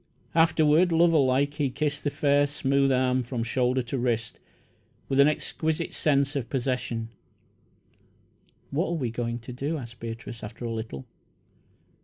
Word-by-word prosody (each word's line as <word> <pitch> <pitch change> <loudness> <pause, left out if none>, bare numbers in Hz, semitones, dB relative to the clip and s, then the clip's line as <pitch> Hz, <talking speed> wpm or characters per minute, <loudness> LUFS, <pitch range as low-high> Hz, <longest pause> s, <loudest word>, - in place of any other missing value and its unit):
Afterward, 165 +1 +4
lover 165 -1 +4
like, 135 +2 +2
he 145 -2 0
kissed 145 +2 -2
the 145 - +1
fair, 145 0 +2
smooth 140 -1 +1
arm 130 0 +2
from 120 -1 -3
shoulder 125 +2 +1
to 125 +2 -3
wrist, 120 -2 -1 0.7
with 135 - 0
an 140 - +8
exquisite 160 +2 -1
sense 140 -2 +1
of 125 -5 -3
possession. 125 -3 -2 1.6
"What 155 +6 0
are - - -1
we 125 -6 -2
going 115 0 -3
to 125 +2 -8
do?" 140 +6 -2
asked 120 -4 -9
Beatrice, 115 0 -7
after 115 +3 -7
a 115 - -2
little. 110 - -6
135 Hz, 150 wpm, -27 LUFS, 120-145 Hz, 1.6 s, an